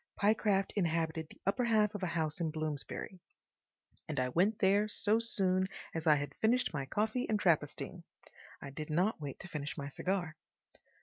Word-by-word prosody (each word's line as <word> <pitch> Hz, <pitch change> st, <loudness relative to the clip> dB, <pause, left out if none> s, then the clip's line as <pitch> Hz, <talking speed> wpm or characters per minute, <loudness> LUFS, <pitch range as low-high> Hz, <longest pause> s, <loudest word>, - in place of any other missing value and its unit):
Pyecraft 205 Hz, -2 st, +2 dB
inhabited 165 Hz, -3 st, 0 dB
the -, -, -16 dB
upper 200 Hz, +6 st, +1 dB
half 215 Hz, -2 st, +3 dB
of 205 Hz, -, -5 dB
a 185 Hz, -, 0 dB
house 160 Hz, -1 st, -2 dB
in 165 Hz, -, +1 dB
Bloomsbury, 155 Hz, +4 st, -4 dB, 0.9 s
and 150 Hz, -4 st, -1 dB
I 125 Hz, 0 st, +1 dB
went 190 Hz, -, +2 dB
there 200 Hz, +2 st, +3 dB
so 215 Hz, +1 st, +2 dB
soon 190 Hz, -5 st, +2 dB, 0.3 s
as 160 Hz, 0 st, -3 dB
I 155 Hz, -, +7 dB
had 145 Hz, 0 st, -3 dB
done 225 Hz, +3 st, +5 dB, 0.2 s
my 135 Hz, -3 st, -3 dB
coffee 220 Hz, -, 0 dB
and 215 Hz, -1 st, +2 dB
Trappistine. 155 Hz, -6 st, 0 dB, 0.6 s
I 140 Hz, -, -8 dB
did 150 Hz, +3 st, -6 dB
not 180 Hz, +4 st, +1 dB
wait 140 Hz, -2 st, -6 dB
to 190 Hz, -, -7 dB
finish 145 Hz, -4 st, -5 dB
my 140 Hz, 0 st, -4 dB
cigar. 175 Hz, 0 st, -2 dB
175 Hz, 175 wpm, -33 LUFS, 155-205 Hz, 0.9 s, I